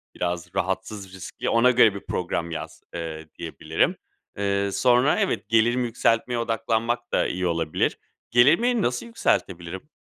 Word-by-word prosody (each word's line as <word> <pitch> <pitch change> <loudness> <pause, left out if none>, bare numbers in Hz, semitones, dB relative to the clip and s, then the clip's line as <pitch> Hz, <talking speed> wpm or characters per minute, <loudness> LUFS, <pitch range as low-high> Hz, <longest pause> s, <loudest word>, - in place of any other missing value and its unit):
biraz 90 0 -3
rahatsız, 95 +1 -3
riskli 95 -1 -5
ona 120 +2 +5
göre 115 -4 +5
bir 100 - -8
program 85 -1 -2
yaz." 85 - -6
eee, 80 -2 -6
diyebilirim. 80 -1 -1 0.4
Eee, 100 0 0
sonra, 125 +6 +3
evet, - - -1
gelirimi 120 +2 +3
yükseltmeye 115 +1 +1
odaklanmak 115 +1 -1
da - - +2
iyi 90 0 -1
olabilir. 80 -2 0 0.3
Gelirimi 170 - +4
nasıl 120 0 -1
yükseltebilirim? 95 - -2
110 Hz, 130 wpm, -24 LUFS, 90-120 Hz, 0.4 s, ona